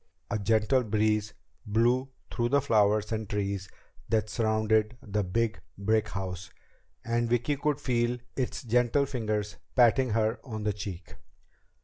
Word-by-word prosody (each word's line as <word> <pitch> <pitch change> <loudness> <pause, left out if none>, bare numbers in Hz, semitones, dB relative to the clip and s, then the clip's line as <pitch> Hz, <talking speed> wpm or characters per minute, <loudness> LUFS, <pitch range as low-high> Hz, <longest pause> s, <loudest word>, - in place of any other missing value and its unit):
A 105 - 0
gentle 110 +5 +2
breeze 105 -1 0 0.3
blew 120 +4 +2 0.2
through 120 -1 0
the 140 +2 +4
flowers 105 -4 +2
and 110 -2 -3
trees 100 -2 -2 0.4
that 110 -2 +1
surrounded 110 0 +1
the 105 0 -1
big 110 +4 -1 0.2
brick 110 +2 +1
house, 95 -2 -5 0.6
and 120 0 0
Vicki 120 +5 +1
could 145 +1 0
feel 120 -3 0 0.2
its 130 0 -2
gentle 125 +4 +2
fingers 105 -6 -2 0.2
patting 125 +1 +5
her 110 +1 +1
on 110 -5 -6
the 105 -1 +1
cheek. 95 -6 -7
110 Hz, 135 wpm, -29 LUFS, 105-120 Hz, 0.6 s, patting